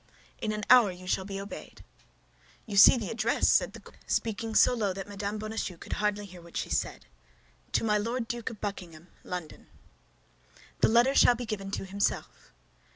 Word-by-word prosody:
"In 215 Hz, -, -2 dB
an 210 Hz, 0 st, -4 dB
hour 245 Hz, -5 st, +7 dB
you 180 Hz, 0 st, -11 dB
shall 190 Hz, +1 st, -1 dB
be 195 Hz, 0 st, -5 dB
obeyed." 200 Hz, +1 st, -9 dB, 0.8 s
"You 210 Hz, -, -6 dB
see 200 Hz, +6 st, +9 dB
the 220 Hz, -4 st, -4 dB
address," 225 Hz, 0 st, +1 dB
said -, -, +3 dB
the -, -, -10 dB
queen, -, -, -17 dB
speaking 225 Hz, 0 st, -2 dB
so -, -, +6 dB
low 210 Hz, -5 st, -1 dB
that 195 Hz, +1 st, -7 dB
Mme. 205 Hz, +1 st, -4 dB
Bonacieux 215 Hz, -4 st, -4 dB
could -, -, -6 dB
hardly 210 Hz, 0 st, 0 dB
hear 180 Hz, -2 st, -12 dB
what 170 Hz, 0 st, -9 dB
she -, -, -3 dB
said, -, -, -2 dB, 0.7 s
"To -, -, +2 dB
my 210 Hz, -1 st, +2 dB
Lord 230 Hz, +2 st, -2 dB
Duke 235 Hz, -1 st, -4 dB
of 220 Hz, -, -10 dB
Buckingham, 180 Hz, -5 st, -7 dB
London." 180 Hz, -4 st, -7 dB, 1.1 s
"The -, -, +4 dB
letter 240 Hz, +4 st, +4 dB
shall 245 Hz, -, +6 dB
be 245 Hz, +1 st, -5 dB
given 205 Hz, -3 st, -4 dB
to 195 Hz, -, -4 dB
himself." 200 Hz, +1 st, -3 dB
210 Hz, 185 wpm, -29 LUFS, 195-225 Hz, 1.1 s, see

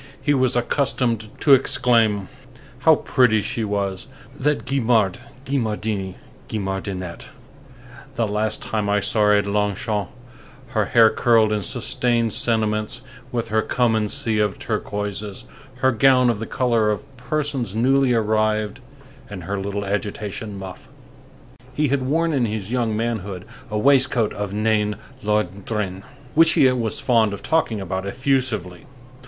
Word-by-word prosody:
He 145 Hz, -, +1 dB
was 130 Hz, -2 st, +2 dB
accustomed 120 Hz, -3 st, 0 dB
to 145 Hz, -, +6 dB
exclaim: 115 Hz, -6 st, +3 dB, 0.5 s
"How -, -, +6 dB
pretty 110 Hz, -5 st, +2 dB
she 115 Hz, -, -2 dB
was—that 130 Hz, +9 st, -3 dB
Guimard 120 Hz, -5 st, +1 dB, 0.3 s
Guimardini 110 Hz, -7 st, -2 dB, 0.3 s
Guimardinette, 95 Hz, -3 st, -4 dB, 0.9 s
the 115 Hz, -3 st, 0 dB
last 105 Hz, +1 st, -1 dB
time 105 Hz, -2 st, -2 dB
I 105 Hz, 0 st, +3 dB
saw 100 Hz, +3 st, +1 dB
her 105 Hz, -, +5 dB
at 100 Hz, -1 st, +3 dB
Longchamps, 105 Hz, 0 st, -1 dB, 0.6 s
her 110 Hz, -5 st, 0 dB
hair 115 Hz, 0 st, +5 dB
curled 110 Hz, -3 st, +3 dB
in 105 Hz, -, -1 dB
sustained 120 Hz, -1 st, 0 dB
sentiments, 110 Hz, +1 st, 0 dB, 0.3 s
with 120 Hz, -2 st, -2 dB
her 110 Hz, 0 st, +2 dB
come 120 Hz, +1 st, +1 dB
and 105 Hz, -1 st, 0 dB
see 115 Hz, -5 st, 0 dB
of 105 Hz, -2 st, 0 dB
turquoises, 105 Hz, 0 st, -4 dB, 0.4 s
her 130 Hz, -, +4 dB
gown 125 Hz, +1 st, +4 dB
of 110 Hz, -, -4 dB
the 115 Hz, -, -5 dB
color 115 Hz, -4 st, +1 dB
of 105 Hz, +3 st, -2 dB
persons 125 Hz, -3 st, -2 dB
newly 135 Hz, +3 st, +3 dB
arrived, 110 Hz, -2 st, 0 dB, 0.5 s
and 95 Hz, -4 st, -7 dB
her 100 Hz, +3 st, -3 dB
little 100 Hz, +1 st, -3 dB
agitation 105 Hz, +1 st, -4 dB
muff!" 95 Hz, -1 st, -9 dB, 0.9 s
He 150 Hz, 0 st, +1 dB
had 140 Hz, 0 st, +1 dB
worn 160 Hz, +5 st, 0 dB
in 125 Hz, -5 st, +1 dB
his 105 Hz, -1 st, -4 dB
young 115 Hz, -4 st, 0 dB
manhood 105 Hz, -5 st, -3 dB, 0.2 s
a 105 Hz, -, -2 dB
waistcoat 130 Hz, -2 st, +3 dB
of 105 Hz, -1 st, -4 dB
Nain 105 Hz, 0 st, +1 dB, 0.3 s
Londrin, 100 Hz, -1 st, -2 dB, 0.3 s
which 165 Hz, +1 st, +5 dB
he 135 Hz, -, +5 dB
was 115 Hz, -4 st, -2 dB
fond 115 Hz, -5 st, +2 dB
of 100 Hz, -, -7 dB
talking 160 Hz, -9 st, 0 dB
about 95 Hz, 0 st, -4 dB
effusively. 125 Hz, -4 st, -1 dB
110 Hz, 135 wpm, -22 LUFS, 105-125 Hz, 0.9 s, to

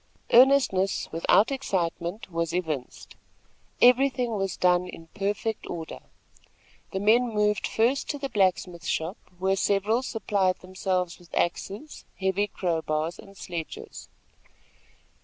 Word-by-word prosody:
Earnestness 245 Hz, -7 st, +4 dB
without 170 Hz, -, +3 dB
excitement 185 Hz, -6 st, -2 dB
was 165 Hz, 0 st, -1 dB
evinced. 155 Hz, -8 st, -4 dB, 0.7 s
Everything 250 Hz, -1 st, +4 dB
was 195 Hz, -4 st, -2 dB
done 180 Hz, 0 st, +3 dB
in 165 Hz, -2 st, -11 dB
perfect 205 Hz, +2 st, -2 dB
order. 165 Hz, -2 st, -6 dB, 0.9 s
The 190 Hz, -, -2 dB
men 230 Hz, +5 st, +4 dB
moved 210 Hz, -1 st, +1 dB
first 245 Hz, +5 st, +1 dB
to 290 Hz, -, -1 dB
the 275 Hz, -1 st, -3 dB
blacksmith 185 Hz, -6 st, 0 dB
shop, 165 Hz, +6 st, -1 dB, 0.2 s
where 190 Hz, +1 st, +1 dB
several 205 Hz, +4 st, +1 dB
supplied 200 Hz, -7 st, 0 dB
themselves 185 Hz, -1 st, -2 dB
with 175 Hz, -1 st, -19 dB
axes, 200 Hz, -, -2 dB, 0.2 s
heavy 190 Hz, +2 st, +1 dB
crow 170 Hz, -5 st, -1 dB
bars 155 Hz, +2 st, -2 dB
and 195 Hz, -1 st, -14 dB
sledges. 170 Hz, -3 st, -7 dB
195 Hz, 120 wpm, -26 LUFS, 175-220 Hz, 0.9 s, Earnestness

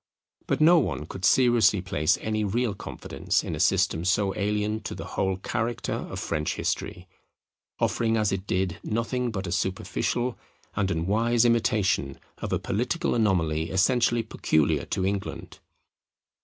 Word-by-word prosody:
But -, -, 0 dB
no 170 Hz, +2 st, +7 dB
one 95 Hz, -, -2 dB
could 95 Hz, +4 st, -9 dB
seriously 120 Hz, -1 st, +4 dB
place 75 Hz, -4 st, +1 dB
any 110 Hz, -1 st, -1 dB
real 110 Hz, +2 st, 0 dB
confidence -, -, -3 dB
in -, -, -4 dB
a -, -, -4 dB
system 80 Hz, -, +2 dB
so 95 Hz, +1 st, +1 dB
alien 105 Hz, +1 st, -1 dB
to 105 Hz, -, -6 dB
the -, -, -7 dB
whole 95 Hz, -1 st, 0 dB
character 115 Hz, +4 st, -2 dB
of -, -, -5 dB
French 75 Hz, 0 st, -2 dB
history, 90 Hz, +1 st, -3 dB, 0.7 s
offering 115 Hz, -1 st, +1 dB
as 105 Hz, -2 st, +1 dB
it 95 Hz, +1 st, -3 dB
did 90 Hz, -2 st, -1 dB
nothing 120 Hz, +3 st, -1 dB
but 100 Hz, -4 st, -4 dB
a 85 Hz, -, -4 dB
superficial 115 Hz, +7 st, -1 dB, 0.4 s
and 100 Hz, -1 st, 0 dB
unwise 110 Hz, +8 st, +2 dB
imitation 105 Hz, -, +1 dB, 0.2 s
of -, -, -4 dB
a -, -, +2 dB
political 125 Hz, -, -1 dB
anomaly 85 Hz, -8 st, +1 dB
essentially 120 Hz, +4 st, +2 dB
peculiar 80 Hz, -8 st, +1 dB
to 95 Hz, -, -2 dB
England. 100 Hz, 0 st, -4 dB
105 Hz, 145 wpm, -26 LUFS, 95-115 Hz, 0.7 s, no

